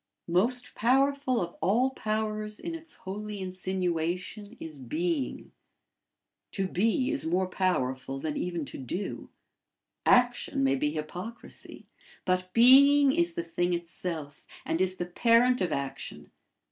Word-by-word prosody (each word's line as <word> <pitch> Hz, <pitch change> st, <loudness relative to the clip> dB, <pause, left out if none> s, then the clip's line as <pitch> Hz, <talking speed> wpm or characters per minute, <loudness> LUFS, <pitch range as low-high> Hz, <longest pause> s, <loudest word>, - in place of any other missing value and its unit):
Most 240 Hz, +7 st, +1 dB
powerful 270 Hz, +2 st, +2 dB
of 170 Hz, -, -7 dB
all 230 Hz, +10 st, +3 dB
powers 215 Hz, -2 st, -2 dB
in 335 Hz, -, -5 dB
its 330 Hz, 0 st, -9 dB
holy 210 Hz, +2 st, -6 dB
insinuation 185 Hz, +3 st, -3 dB
is 155 Hz, -3 st, -8 dB
being. 150 Hz, +2 st, -2 dB, 1.0 s
To 195 Hz, -1 st, -1 dB
be 225 Hz, -, +1 dB
is 300 Hz, -, +1 dB
more 180 Hz, +3 st, +1 dB
powerful 135 Hz, -8 st, -1 dB
than 150 Hz, +2 st, -3 dB
even 175 Hz, -4 st, -2 dB
to -, -, -8 dB
do. 175 Hz, -, -4 dB, 0.8 s
Action 245 Hz, -, +3 dB
may 135 Hz, 0 st, +3 dB
be 150 Hz, +2 st, 0 dB
hypocrisy, 175 Hz, +9 st, -7 dB, 0.4 s
but 185 Hz, 0 st, 0 dB
being 275 Hz, +5 st, +7 dB
is 170 Hz, -7 st, +1 dB
the 170 Hz, -, -3 dB
thing 175 Hz, +1 st, 0 dB
itself, 170 Hz, -3 st, -6 dB, 0.2 s
and 165 Hz, -, 0 dB
is 185 Hz, 0 st, +1 dB
the 175 Hz, -, -3 dB
parent 230 Hz, +6 st, +3 dB
of 180 Hz, -3 st, 0 dB
action. 140 Hz, -1 st, -5 dB
185 Hz, 130 wpm, -29 LUFS, 170-230 Hz, 1.0 s, being